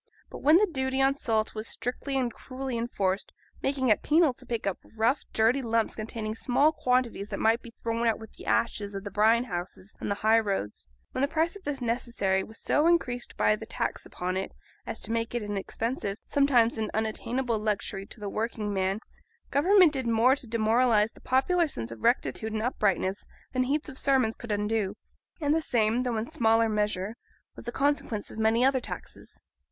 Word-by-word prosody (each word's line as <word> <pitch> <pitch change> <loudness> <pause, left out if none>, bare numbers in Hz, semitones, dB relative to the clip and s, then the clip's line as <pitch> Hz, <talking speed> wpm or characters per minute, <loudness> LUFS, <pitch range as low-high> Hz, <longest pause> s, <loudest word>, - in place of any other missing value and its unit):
But - - -7
when 305 +4 +6
the 420 - +5
duty 265 -6 -2
on 270 0 +4
salt 220 -5 0
was 215 +1 -4
strictly 270 +3 -3
and 245 -3 0
cruelly 260 -1 -5
enforced, 205 -5 -1 0.3
making 270 -2 0
it 215 - +4
penal 310 -2 +4
to 255 0 -9
pick 230 -3 -3
up 195 -2 -1 0.2
rough 235 +6 +2
dirty 230 +5 +3
lumps 230 -2 0
containing 215 0 -4
small 270 +6 +3
quantities 250 -8 0
that - - -4
might 225 +2 +3
be 235 - -11
thrown 230 +1 0
out 225 - +2
with 220 -1 -12
the - - -12
ashes 205 -3 0
of 195 - -5
the 200 - -6
brine 225 +3 +4
houses 185 -2 -6
on - - -3
the 200 - +1
high 225 +1 +6
roads; 195 - -3 0.2
when - - -3
the 280 - +3
price 325 +4 0
of 400 - -12
this 285 -2 -3
necessary 230 -5 0
was 220 +3 -9
so 300 +2 +2
increased 250 -8 0
by 215 - +4
the 220 +1 -9
tax - - -3
upon 185 +1 -3
it 190 - -3 0.4
as - - -4
to - - -4
make 230 +1 -1
it 240 - -1
an 205 0 -3
expensive, 205 +1 -3
sometimes 245 -5 +3
an 215 -1 -1
unattainable, 230 +2 -1
luxury 205 -2 -2
to - - -10
the 205 - -5
working 215 0 -2
man, 190 +1 0 0.5
Government 360 +2 +5
did 260 -3 -2
more 230 +3 +4
to 260 - -7
demoralise 225 0 +3
the - - -19
popular 330 +7 +2
sense 115 - -5
of 115 -1 -9
rectitude 215 - +1
and 215 0 -1
uprightness 200 -5 0 0.3
than 255 - +1
heaps 285 +4 0
of 265 -3 -5
sermons 260 -5 +2
could 235 - -7
undo. 210 -1 0 0.4
And 295 -2 +2
the 325 - +2
same, 230 -3 +1
though 245 -3 -1
in 220 - -1
smaller 225 -1 +2
measure, 210 -1 -1 0.4
was - - -11
the 240 - -3
consequence 275 -6 0
of - - -8
many 225 +3 +3
other 265 -1 +3
taxes. - - -9
230 Hz, 200 wpm, -28 LUFS, 215-260 Hz, 0.5 s, when